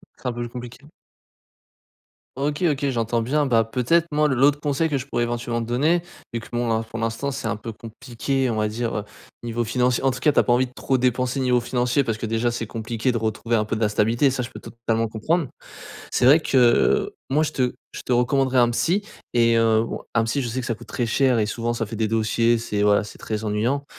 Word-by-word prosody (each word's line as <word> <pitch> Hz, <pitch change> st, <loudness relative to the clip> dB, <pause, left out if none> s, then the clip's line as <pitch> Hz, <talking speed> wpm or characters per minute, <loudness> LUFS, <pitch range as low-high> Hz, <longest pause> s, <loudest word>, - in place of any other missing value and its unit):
C'est -, -, -7 dB
un 125 Hz, -, -1 dB
peu 120 Hz, 0 st, -4 dB
compliqué. 125 Hz, +3 st, -9 dB, 1.5 s
OK, 145 Hz, +3 st, -2 dB
OK, 140 Hz, 0 st, -1 dB
j'entends 115 Hz, -1 st, 0 dB
bien 145 Hz, +4 st, +1 dB
bah, 115 Hz, -3 st, +3 dB
peut-être 125 Hz, +9 st, +1 dB
moi, 150 Hz, 0 st, +3 dB
l'autre 140 Hz, +1 st, +3 dB
conseil 150 Hz, +2 st, 0 dB
que 140 Hz, -3 st, 0 dB
je 130 Hz, -, -8 dB
pourrais 120 Hz, -3 st, 0 dB
éventuellement 120 Hz, 0 st, -2 dB
te -, -, -7 dB
donner, 155 Hz, +8 st, +2 dB, 0.3 s
vu 115 Hz, -, -3 dB
que 115 Hz, -, -11 dB
bon 120 Hz, 0 st, -1 dB
là, 110 Hz, 0 st, +1 dB
pour 115 Hz, +1 st, -6 dB
l'instant 115 Hz, +5 st, -2 dB
c'est 130 Hz, -4 st, -4 dB
un 115 Hz, -, -1 dB
peu 110 Hz, +1 st, -7 dB
compliqué 120 Hz, +4 st, -3 dB
on 110 Hz, -, -2 dB
va 105 Hz, 0 st, +1 dB
dire 110 Hz, -1 st, -3 dB, 0.4 s
niveau 120 Hz, 0 st, -2 dB
financier 125 Hz, +2 st, +1 dB
en 135 Hz, -, +3 dB
tout 130 Hz, -, -6 dB
cas 150 Hz, -, +3 dB
tu -, -, -9 dB
as -, -, +6 dB
pas 120 Hz, -, +2 dB
envie 130 Hz, +1 st, +2 dB
de -, -, -18 dB
trop 130 Hz, 0 st, 0 dB
dépenser 125 Hz, +1 st, 0 dB
niveau 125 Hz, -2 st, +3 dB
financier 125 Hz, +3 st, 0 dB
parce 115 Hz, -4 st, -3 dB
que 115 Hz, -, -3 dB
déjà 115 Hz, +2 st, 0 dB
c'est 115 Hz, -1 st, -4 dB
compliqué 115 Hz, +3 st, -2 dB
de 120 Hz, -, -1 dB
retrouver 110 Hz, +1 st, -1 dB
un 110 Hz, -1 st, +1 dB
peu 110 Hz, -, -2 dB
de 110 Hz, -, -4 dB
la 105 Hz, -, +3 dB
stabilité, 115 Hz, +6 st, +2 dB
ça, 130 Hz, -1 st, -2 dB
je 120 Hz, -, -6 dB
peux -, -, -8 dB
totalement 115 Hz, -1 st, -2 dB
comprendre. 145 Hz, +9 st, -1 dB, 0.6 s
C'est -, -, +1 dB
vrai 145 Hz, +6 st, +7 dB
que 125 Hz, -6 st, +3 dB, 0.2 s
moi, 145 Hz, +4 st, +2 dB
je 155 Hz, -1 st, -1 dB
te 125 Hz, -3 st, 0 dB, 0.2 s
je -, -, -7 dB
te -, -, -1 dB
recommanderais 130 Hz, +1 st, +2 dB
un 120 Hz, -1 st, +5 dB
psy 170 Hz, -, +1 dB, 0.3 s
et 115 Hz, -1 st, +4 dB
heu, 110 Hz, -1 st, +3 dB
bon, -, -, -5 dB
un 115 Hz, -, +3 dB
psy 115 Hz, +5 st, -1 dB
je 125 Hz, -, -2 dB
sais 125 Hz, +3 st, -2 dB
que 125 Hz, -, -5 dB
ça 120 Hz, -, -1 dB
coûte -, -, -13 dB
très 120 Hz, -, -2 dB
cher 125 Hz, +1 st, +2 dB
et 105 Hz, -, +1 dB
souvent 120 Hz, +2 st, -2 dB
ça 115 Hz, -, -2 dB
fait 110 Hz, +1 st, -7 dB
des 110 Hz, 0 st, 0 dB
dossiers, 115 Hz, +2 st, +2 dB
c'est 105 Hz, -3 st, -2 dB
voilà, 105 Hz, 0 st, +4 dB
c'est 105 Hz, -, -11 dB
très 110 Hz, 0 st, -4 dB
ennuyant. 115 Hz, +7 st, 0 dB
120 Hz, 245 wpm, -23 LUFS, 115-135 Hz, 1.5 s, vrai